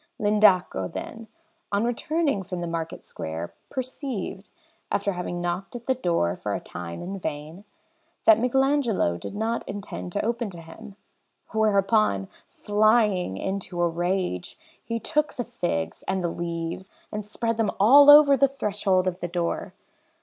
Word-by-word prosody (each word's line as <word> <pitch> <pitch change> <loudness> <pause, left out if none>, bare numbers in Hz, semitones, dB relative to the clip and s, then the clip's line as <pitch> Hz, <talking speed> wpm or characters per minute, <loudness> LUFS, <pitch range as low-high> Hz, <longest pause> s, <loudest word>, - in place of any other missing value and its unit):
L'Indaco, 205 - +3
then, 225 0 -7 0.4
on 200 +1 +1
returning 280 0 0
from 180 -1 -5
the 175 - -3
market 165 -1 -5
square, 80 +2 -6 0.2
perceived, 255 - -5 0.4
after 200 0 0
having 175 -1 -4
knocked 175 +5 -3
at 240 -1 -7
the 260 - +2
door 170 - 0
for - - -3
a - - -2
time 85 -1 -7
in 195 +2 -5
vain, 160 +4 -6 0.6
that 220 0 +7
Michelagnolo 250 - +1
did 140 - -7
not 225 +2 -1
intend 90 - -6
to - - -1
open 235 -1 -1
to 175 -3 -10
him; 195 +6 -12 0.6
whereupon, 210 - +2 0.2
flying 210 - +2
into 190 - -4
a 175 - +3
rage, 175 - -2 0.3
he 230 0 -3
took 300 +6 -1
the 245 - -2
figs 80 - -3
and 190 -1 -1
the 170 - 0
leaves 170 +2 -4 0.2
and 210 0 -4
spread 230 +2 -2
them 225 -2 +1
all 280 +8 +8
over 290 -1 +9
the 275 0 +4
threshold 205 -8 0
of 185 -1 -2
the 175 - -3
door. 175 -1 -3
200 Hz, 150 wpm, -25 LUFS, 175-230 Hz, 0.6 s, over